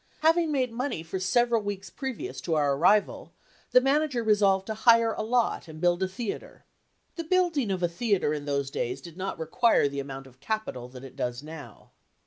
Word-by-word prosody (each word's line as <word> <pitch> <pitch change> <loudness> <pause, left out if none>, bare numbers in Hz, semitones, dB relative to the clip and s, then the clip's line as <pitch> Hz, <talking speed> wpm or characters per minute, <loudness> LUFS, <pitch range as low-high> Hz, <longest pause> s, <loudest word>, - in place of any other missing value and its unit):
Having 325 0 +3
made 260 -4 0
money 240 - -3
for 170 +3 -4
several 235 +5 +2
weeks 195 -2 -5
previous 265 -4 -5
to 165 - -1
our 145 -2 +2
arrival, 200 +8 +2 0.4
the - - +6
manager 270 -1 +1
resolved 200 -3 +3
to 220 - -3
hire 230 0 +4
a - - -4
lot 235 -4 0
and 155 -1 -10
build 175 +1 +2
a 190 - +2
theater. 200 +3 -6 0.5
The 335 - -3
building 330 - +1
of 185 -2 -2
a - - +4
theater 180 -2 0
in 145 -1 -4
those 140 -1 -1
days 125 -1 -3
did 170 -2 -12
not 190 +1 -4
require 165 +4 +2
the 140 0 -4
amount 135 -1 -6
of 130 -1 -18
capital 215 - -4
that 125 0 -11
it 135 - -11
does 125 +2 -3
now. 150 -7 -11
195 Hz, 195 wpm, -27 LUFS, 150-240 Hz, 0.5 s, the